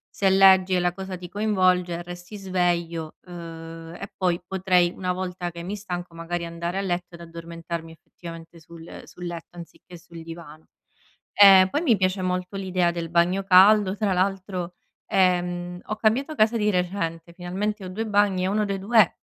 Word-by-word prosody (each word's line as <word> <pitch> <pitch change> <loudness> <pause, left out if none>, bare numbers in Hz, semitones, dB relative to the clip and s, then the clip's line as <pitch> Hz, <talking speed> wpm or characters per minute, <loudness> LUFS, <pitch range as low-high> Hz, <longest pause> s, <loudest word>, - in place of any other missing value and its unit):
se 195 - +2
leggi 190 -1 +6
e - - +2
la 175 0 0
cosa 190 0 -6
ti 180 0 -9
coinvolge 185 -3 +1
resti 175 +4 -9
sveglio, 175 -4 -1
uhm, 165 -1 -9
e 200 - -8
poi 180 -2 0
potrei 180 -2 +2
una 180 -1 -2
volta 180 -1 -4
che 170 0 -9
mi 195 +4 -4
stanco 180 -4 -6
magari 170 +1 -4
andare 170 +2 -4
a 195 - 0
letto 175 -2 -3
ed 170 - -13
addormentarmi 165 0 -7
effettivamente 165 0 -12
sul 165 +1 -12
sul 180 - -10
letto 175 0 -8
anziché 175 +1 -12
sul 170 0 -12
divano. 160 -1 -11 0.7
Ehm, 195 -2 +8
poi 295 - -1
mi 240 -11 +3
piace 185 0 0
molto 185 +1 -2
l'idea 185 -2 0
del 170 -1 -5
bagno 175 +3 +2
caldo. 195 +1 +5
Tra 205 -3 0
l'altro, 185 -1 -2 0.3
ehm, 180 -2 0
ho 215 - -4
cambiato 250 +8 +1
casa 225 -1 +3
di 210 -1 +1
recente 175 -3 -2
finalmente 195 +4 -4
ho - - -6
2 215 +5 -4
bagni 205 -3 +2
e - - +1
uno 210 +2 +1
dei 200 -1 -2
2 210 -1 +3
180 Hz, 175 wpm, -24 LUFS, 170-195 Hz, 0.7 s, Ehm